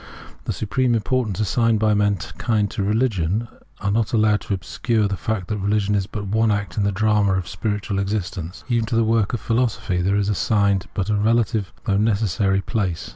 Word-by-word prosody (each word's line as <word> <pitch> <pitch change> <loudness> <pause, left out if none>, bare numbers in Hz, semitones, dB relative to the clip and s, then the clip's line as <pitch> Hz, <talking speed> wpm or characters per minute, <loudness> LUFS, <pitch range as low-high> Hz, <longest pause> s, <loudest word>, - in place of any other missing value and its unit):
The - - -1
supreme 120 +3 0
importance 110 -3 -1
assigned 115 +2 +2
by 110 0 +3
mankind 105 +1 0
to - - -3
religion 105 -1 0 0.4
is 100 - +2
not 110 0 0
allowed 110 -2 +3
to 100 - -2
obscure 105 +5 -1
the 100 - -2
fact 95 +1 -3
that 105 -2 -2
reUgion 105 0 +1
is 100 -2 0
but 105 -1 -5
one 110 +3 +2
act 100 -1 -1
in 105 - 0
the 100 - +2
drama 105 0 +2
of 95 -3 -1
spiritual 100 +2 -2
existence. 95 -3 -3
Even 115 -3 0
to 115 - -1
the 115 - +3
work 110 -1 +1
of 120 - -1
philosophy 115 -6 0
there 95 +3 +1
is 100 -1 +1
assigned 100 -2 +1
but 100 +2 -1
a - - +2
relative, 110 -1 +1
though 100 -2 +1
necessary, 100 -2 +1
place. 95 -7 -2
105 Hz, 190 wpm, -22 LUFS, 100-110 Hz, 0.4 s, by